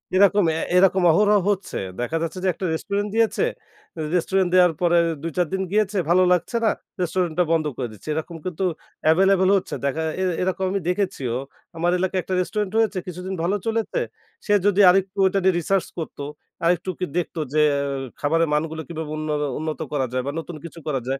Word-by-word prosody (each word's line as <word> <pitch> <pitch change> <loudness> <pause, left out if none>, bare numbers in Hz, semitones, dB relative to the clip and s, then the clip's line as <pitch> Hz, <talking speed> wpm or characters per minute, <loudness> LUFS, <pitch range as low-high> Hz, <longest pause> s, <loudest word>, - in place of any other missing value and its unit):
এরকম 200 +1 +5
অ্যা 160 +1 -2 0.2
এরকম 190 0 +4
অহরহ 205 +4 +4
হচ্ছে। 195 -2 -2 0.2
দেখা 120 +7 -1
যাচ্ছে 165 +2 -3
যে - - +1
একটা 185 - -5
রেস্টুরেন্ট 200 +5 -2
দিয়েছে, 225 - +2 0.7
রেস্টুরেন্ট 185 +1 +1
দেয়ার 180 -2 +6
পরে 175 -1 +4 0.3
২-৪ 165 +1 0
দিন 190 - 0
গিয়েছে, 210 -1 +1
ভালো 185 +2 +5
লাগছে 180 +6 +1
না, 215 - +4 0.3
রেস্টুরেন্টটা 180 -1 +1
বন্ধ 165 -2 +2
করে 125 - -2
দিচ্ছে। 105 +8 -11
এরকম 160 +2 -4
কিন্তু 185 +1 -2 0.4
অ্যাভেইলেবল 190 +3 +4
হচ্ছে। 190 - -4
দেখা 155 +4 -1 0.2
এর 185 - +1
এরকম 185 +1 -1
আমি 200 - 0
দেখেছিও। 180 - -1 0.4
আমার 175 +2 +1
এলাকায় 185 0 0
একটা 190 - -4
রেস্টুরেন্ট 205 +1 -2
হয়েছে, 220 -3 +2
কিছুদিন 180 +2 -5
ভালো 185 +4 +1
চলেছে। 225 - -1 0.5
সে 205 - +2
যদি 205 -1 +3
আর 180 - +6
একটু 190 +1 -21
ওইটা 190 +1 +2
নিয়ে 190 0 +4
রিসার্চ 190 +3 +1
করত, 165 -3 -6 0.5
আরেকটু 175 +1 +1
ওকে 180 - -3
দেখত 175 - -2 0.2
যে 155 - +4
অ্যাও 140 0 -1 0.3
খাবারের 165 +2 +2
মানগুলো 160 +1 -1
কীভাবে 160 -2 -5
উন্নরো 150 -1 -1
উন্নত 155 0 -3
করা 135 -3 +1
যায় 130 - 0
বা - - 0
নতুন 165 +1 -7
কিছু 170 0 -9
করা 140 -3 0
যায়। 135 +1 -1
180 Hz, 185 wpm, -23 LUFS, 160-190 Hz, 0.7 s, দেয়ার